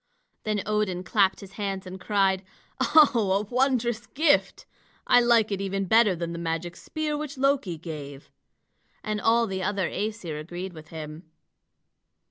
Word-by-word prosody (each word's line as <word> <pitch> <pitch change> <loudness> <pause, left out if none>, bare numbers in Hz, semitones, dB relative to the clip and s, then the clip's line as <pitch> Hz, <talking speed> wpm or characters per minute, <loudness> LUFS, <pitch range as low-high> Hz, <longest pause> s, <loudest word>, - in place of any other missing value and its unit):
Then 210 -2 -1
Odin 210 -4 -1
clapped 190 +1 +2
his 195 -1 -11
hands 195 -2 -4
and 185 0 -8
cried: 195 -2 +1 0.4
"Oh, 225 -10 +4
wondrous 245 -3 +1
gift! 295 +1 +1 0.4
I 245 - +6
like 235 -3 +4
it 195 -1 -2
even 195 0 -2
better 215 -1 +4
than 170 0 -4
the 170 - -5
magic 170 +1 -3
spear 310 -1 -3
which 295 -2 -5
Loki 265 - +1
gave." 145 -3 -8 0.7
And 215 0 -2
all 230 +1 +3
the 190 -3 -4
other 190 -2 0
Æsir 205 -8 -4
agreed 175 +3 -6
with 155 -1 -12
him. 155 +1 -9
195 Hz, 145 wpm, -26 LUFS, 175-230 Hz, 0.7 s, I